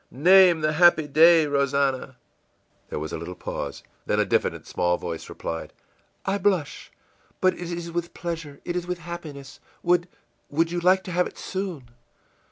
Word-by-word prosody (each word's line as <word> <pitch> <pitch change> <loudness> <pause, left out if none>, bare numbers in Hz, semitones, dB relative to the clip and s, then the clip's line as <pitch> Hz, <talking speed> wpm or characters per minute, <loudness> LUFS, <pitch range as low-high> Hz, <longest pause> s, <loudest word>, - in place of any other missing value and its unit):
î - - -13
ìName 180 -3 +7
the 155 0 +2
happy 170 -1 +5
day, 160 +2 +6
Rosannah!î 140 -2 0 0.7
There - - -4
was 75 0 -5
a - - -3
little - - -7
pause. - - -6 0.2
Then - - +1
a - - +3
diffident - - 0
small 90 0 0
voice 85 -2 -6
replied, 80 0 -6 0.5
ìI 195 +1 -1
blush 180 -7 -1 0.5
but 185 - +3
it 175 -1 -7
is 170 0 -5
with 170 0 -4
pleasure, 165 -5 -5
it 175 - -3
is 175 0 -3
with 180 0 -2
happiness. 150 -5 -9 0.2
Would 175 0 +2 0.4
would 165 +3 +1
you 175 - -1
like 185 +2 +3
to 180 - -7
have 180 +1 +1
it - - -13
soon? 180 -11 -5
170 Hz, 175 wpm, -25 LUFS, 140-175 Hz, 0.7 s, ìName